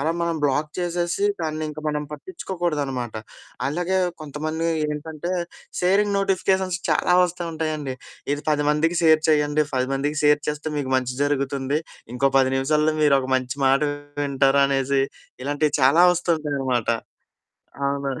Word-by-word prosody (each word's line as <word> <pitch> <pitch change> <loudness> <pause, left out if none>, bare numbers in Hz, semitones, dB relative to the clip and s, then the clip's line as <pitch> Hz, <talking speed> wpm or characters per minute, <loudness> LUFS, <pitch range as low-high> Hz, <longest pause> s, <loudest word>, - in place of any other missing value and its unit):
అలా 155 +3 +1
మనం 170 -1 0
బ్లాక్ 145 +2 +1
చేసేసి, 175 +2 -1 0.2
దాన్నింక 155 -1 -3
మనం 150 0 -1
పట్టిచ్చుకోకూడదనమాట. 150 - -3 0.5
అలాగే 175 +6 0 0.2
కొంతమంది 155 +2 -3 0.3
ఏంటంటే, 155 +3 -5 0.5
సేరింగ్ 200 +3 +2
నోటిఫికేషన్స్ 190 -1 +1
చాలా 165 +3 +3
వస్తా 180 0 -1
ఉంటాయండి. 155 -4 -3 0.4
ఇది 145 - -8
10 145 -1 +1
మందికి 165 +3 +1
షేర్ 160 -1 +5
చెయ్యండి, 150 0 +2
10 130 0 0
మందికి 145 +2 -1
షేర్ 150 0 +5
చేస్తే, 150 +1 -3
మీకు 130 -2 -2
మంచి 125 -1 -1
జరుగుతుంది, 140 0 0 0.3
ఇంకో 135 +2 +2
10 130 0 +3
నిమిషాల్లో 150 +3 +2
మీరొక 140 -3 +3
మంచి 130 +1 -4
మాట 135 +2 +4 0.4
వింటారు 140 0 +3
అనేసి, 135 0 +1 0.4
ఇలాంటియి 145 +2 0
చాలా 150 +7 +6
వస్తూ 175 0 -2
ఉంటాయనమాట. 135 -6 -1 1.0
ఆ! - - +3 0.2
మరి 135 -2 -3
150 Hz, 135 wpm, -23 LUFS, 135-165 Hz, 1.0 s, చాలా